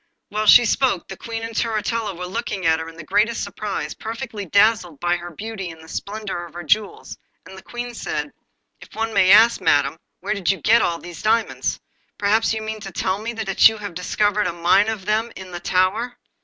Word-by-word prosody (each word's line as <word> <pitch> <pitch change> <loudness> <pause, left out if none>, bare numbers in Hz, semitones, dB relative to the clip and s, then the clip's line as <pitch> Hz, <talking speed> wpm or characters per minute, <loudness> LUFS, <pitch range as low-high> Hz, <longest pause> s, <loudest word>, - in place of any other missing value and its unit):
While 215 +1 -2
she 240 - +9
spoke 250 -5 +1
the 190 - -7
Queen 225 +3 -6
and 225 0 -5
Turritella 220 -2 -1
were 180 - -5
looking 195 -1 -4
at 160 0 +3
her 160 0 -6
in 165 - -14
the 170 - -8
greatest 230 +6 +1
surprise, 210 -2 -4
perfectly 225 -3 -6
dazzled 200 -5 +3
by 175 0 +1
her 175 0 -8
beauty 195 +1 -6
and 165 -1 -11
the 160 - -14
splendour 200 0 -5
of 170 - -19
her 175 - -6
jewels, 205 +7 -1 0.3
and 190 - -12
the 190 - -11
Queen 240 +2 -6
said: - - -4 0.5
'If - - -15
one 225 0 -2
may 195 -2 +4
ask, 220 +2 +7
Madam, 145 -2 +2 0.2
where 205 +2 -1
did 195 -4 -2
you 195 - +2
get 230 +2 +4
all 170 - 0
these 175 -1 -10
diamonds? 225 +1 0 0.4
Perhaps 215 +2 +2
you 220 -1 -2
mean 220 0 -5
to 195 -2 -8
tell 190 +2 -1
me 230 +2 -3
that 220 -2 +5
you 220 - -6
have 205 -3 -7
discovered 205 +4 0
a - - -2
mine 180 +5 +3
of 215 -4 -4
them 220 +2 0
in 185 -1 -9
the 175 - -5
tower! 195 +8 0
205 Hz, 215 wpm, -21 LUFS, 180-225 Hz, 0.5 s, she